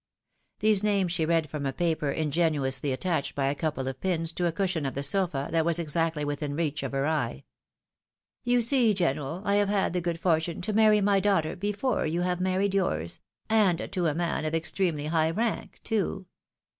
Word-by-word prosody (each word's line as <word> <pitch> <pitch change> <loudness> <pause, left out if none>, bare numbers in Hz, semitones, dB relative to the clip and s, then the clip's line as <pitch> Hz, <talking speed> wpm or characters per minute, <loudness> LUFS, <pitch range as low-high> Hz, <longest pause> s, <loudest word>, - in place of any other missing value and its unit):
These 215 -2 +4
names 200 -4 +1
she 165 -3 0
read 165 -2 +2
from 150 0 -5
a 135 - -1
paper 160 0 -1
ingeniously 145 -3 0
attached 160 +2 -2
by 140 - 0
a 135 - +1
couple 145 -3 -3
of 130 -1 -5
pins 165 -3 0
to 175 +1 -1
a - - 0
cushion 175 -2 -1
of 135 - -3
the 140 - -2
sofa 170 -6 0
that 165 -1 +2
was 170 0 +1
exactly 165 -1 -1
within 145 0 -3
reach 155 -2 -1
of 135 - -4
her 135 0 0
eye. 145 - -1 0.5
" - - -65
You 245 0 +4
see, 235 -3 +4
general, 165 0 -1
I 200 0 +2
have 205 -1 +2
had 200 -4 +1
the 180 - 0
good 170 -1 -2
for 165 -2 +3
tune 160 0 -5
to 210 +4 -2
marry 215 -1 +5
my 200 0 +3
daughter 190 -6 +1
before 205 +5 -1
you 170 +3 -1
have 180 0 -1
married 190 +1 +1
yours 85 - -1 0.2
— - - -67
and 210 -6 +2
to 180 -3 0
a 150 - 0
man 170 -2 -1
of 155 +1 -1
extremely 165 -2 -1
high 160 0 +1
rank 220 +6 -2
too. 195 -3 -1
170 Hz, 205 wpm, -27 LUFS, 150-195 Hz, 0.5 s, marry